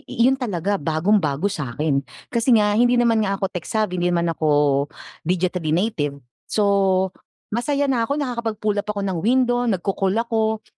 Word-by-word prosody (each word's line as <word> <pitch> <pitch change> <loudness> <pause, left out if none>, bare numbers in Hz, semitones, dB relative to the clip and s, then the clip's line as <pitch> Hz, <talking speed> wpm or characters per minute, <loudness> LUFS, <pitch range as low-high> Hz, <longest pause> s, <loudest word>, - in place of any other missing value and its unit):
yun 255 +3 +2
talaga 200 -5 -1
bagong-bago 160 +1 +1
sa'kin. 145 -2 -1 0.3
Kasi 235 +1 +3
nga 210 -1 +3
hindi 245 +3 +3
naman 230 -2 +3
nga 195 0 0
ako 195 - -3
tech-savvy, 180 +1 -2
hindi 175 - +2
naman 170 -1 +1
ako 155 -1 -3 0.8
digitally 180 -2 -1
native. 165 -7 -1 0.3
So, 195 -2 +2 0.4
masaya 280 +5 0
na 230 -2 +1
ako 280 - 0
nakakapag-pull 225 -6 -2
up - - -13
ako 210 -1 -2
ng 190 -3 -2
window, 245 +2 +2
nagko-call 195 0 0
ako. 220 -1 0
205 Hz, 150 wpm, -22 LUFS, 175-230 Hz, 0.8 s, Kasi